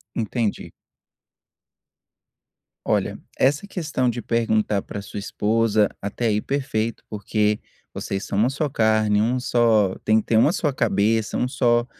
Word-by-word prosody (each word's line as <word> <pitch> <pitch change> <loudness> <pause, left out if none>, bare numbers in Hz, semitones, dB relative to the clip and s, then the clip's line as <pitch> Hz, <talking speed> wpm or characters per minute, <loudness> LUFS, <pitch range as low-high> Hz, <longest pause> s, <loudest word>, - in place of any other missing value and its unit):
Entendi. 115 -1 -2 2.1
Olha, - - 0 0.2
essa 145 +9 +2
questão 155 -10 -1
de 120 0 -3
perguntar 110 -3 +1
para 100 - -7
sua 100 +1 -7
esposa, 110 +1 +1
até 100 +4 -2
aí 105 -1 +1
perfeito, 115 -5 -2
porque 105 0 0 0.3
vocês 100 0 -4
são 100 - -3
uma 115 +4 +3
só 145 +2 -2
carne, 110 -3 +2
um 120 +4 +1
só 115 -6 +2
tem 110 +1 +4
que - - -19
ter 110 - +3
uma 145 - +5
só 155 -6 0
cabeça, 110 -3 +1
um 125 - 0
só 120 -2 +2
110 Hz, 140 wpm, -23 LUFS, 105-125 Hz, 2.1 s, uma